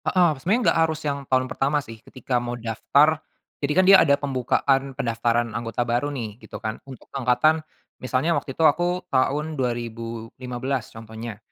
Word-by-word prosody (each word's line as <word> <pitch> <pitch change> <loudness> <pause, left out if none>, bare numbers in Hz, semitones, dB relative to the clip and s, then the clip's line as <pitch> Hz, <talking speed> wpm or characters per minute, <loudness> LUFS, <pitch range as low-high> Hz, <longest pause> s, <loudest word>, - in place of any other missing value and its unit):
Heeh. 180 -3 +4
Sebenarnya 210 - +2
nggak 165 - +2
harus 160 -1 -3
yang 140 -1 0
tahun 130 0 +3
pertama 135 +3 0
sih 115 -6 -10
ketika 125 0 -3
mau 120 0 -4
daftar. 140 +7 +2 0.4
Jadi 140 0 0
kan 185 - +5
dia 195 0 +8
ada 140 -3 +4
pembukaan 135 0 0
pendaftaran 115 -1 0
anggota 115 +1 -2
baru 120 +4 0
nih, 115 -5 -6
gitu - - -9
kan. 110 0 -5
Untuk 130 - -11
angkatan, 135 +4 +2 0.4
misalnya 130 +6 +1
waktu 135 -5 -3
itu 160 - +3
aku 175 +4 +2
tahun 145 +4 +1
2015, 120 0 -4
contohnya. 110 0 -8
130 Hz, 160 wpm, -24 LUFS, 115-150 Hz, 0.4 s, dia